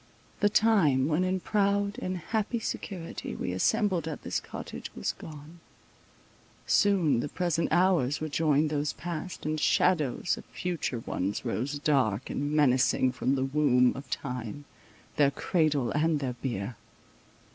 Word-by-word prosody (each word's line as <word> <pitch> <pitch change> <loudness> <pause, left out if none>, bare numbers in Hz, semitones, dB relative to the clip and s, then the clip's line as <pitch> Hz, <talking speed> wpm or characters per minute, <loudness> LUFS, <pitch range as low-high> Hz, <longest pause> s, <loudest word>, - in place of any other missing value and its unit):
The 205 - +4
time 190 -12 +3
when 160 +3 +1
in 185 0 0
proud 200 0 +1
and 185 0 -2
happy 220 +6 -2
security 185 -5 -5
we 90 - -3
assembled 170 - +1
at 155 - -5
this - - -1
cottage, - - -8
was 65 - -1
gone—soon 160 - -3
the 145 - -3
present 170 -1 0
hours 175 -7 +3
would 155 -2 -5
join 155 -1 +2
those 150 0 -1
past, 175 0 -6
and 155 0 -1
shadows 155 -2 +2
of - - -10
future 165 -9 -3
ones 100 -2 -3
rose 140 +6 -2
dark 130 - +1
and 145 +1 -2
menacing 130 -3 +3
from 130 +2 0
the 135 0 0
womb 135 -3 +3
of 135 0 -9
time, 125 +1 -5 0.5
their 145 -2 +5
cradle 145 -4 0
and 155 +1 +1
their 130 -3 -2
bier. 120 -3 -4
150 Hz, 140 wpm, -29 LUFS, 130-175 Hz, 0.5 s, their